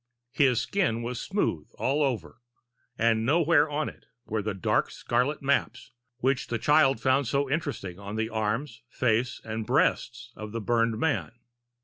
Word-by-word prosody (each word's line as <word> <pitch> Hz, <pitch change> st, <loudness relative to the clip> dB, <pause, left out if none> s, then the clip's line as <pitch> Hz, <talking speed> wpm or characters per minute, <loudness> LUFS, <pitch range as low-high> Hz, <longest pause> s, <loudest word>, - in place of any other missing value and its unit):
His 130 Hz, -4 st, +3 dB
skin 145 Hz, -, 0 dB
was 120 Hz, +1 st, -4 dB
smooth 140 Hz, -, -1 dB
all 140 Hz, +3 st, +1 dB
over, 120 Hz, -, -2 dB, 0.6 s
and 115 Hz, -1 st, +2 dB
nowhere 155 Hz, +3 st, +3 dB
on 150 Hz, +1 st, -1 dB
it -, -, -11 dB, 0.2 s
were 110 Hz, 0 st, -2 dB
the 105 Hz, -1 st, -3 dB
dark 95 Hz, -, +1 dB
scarlet 140 Hz, +4 st, -1 dB
maps 140 Hz, +1 st, 0 dB, 0.3 s
which 130 Hz, 0 st, 0 dB
the 120 Hz, -, -1 dB
child 135 Hz, 0 st, +4 dB
found 130 Hz, +2 st, +2 dB
so 140 Hz, +2 st, +1 dB
interesting 135 Hz, -, -3 dB
on 100 Hz, +1 st, -6 dB
the 110 Hz, 0 st, 0 dB
arms, 115 Hz, +3 st, -2 dB
face, 120 Hz, -1 st, 0 dB
and 110 Hz, 0 st, -3 dB
breast 125 Hz, 0 st, 0 dB
of 105 Hz, 0 st, -8 dB
the 115 Hz, -, -2 dB
burned 115 Hz, 0 st, +1 dB
man. 145 Hz, -2 st, -1 dB
120 Hz, 155 wpm, -27 LUFS, 110-140 Hz, 0.6 s, child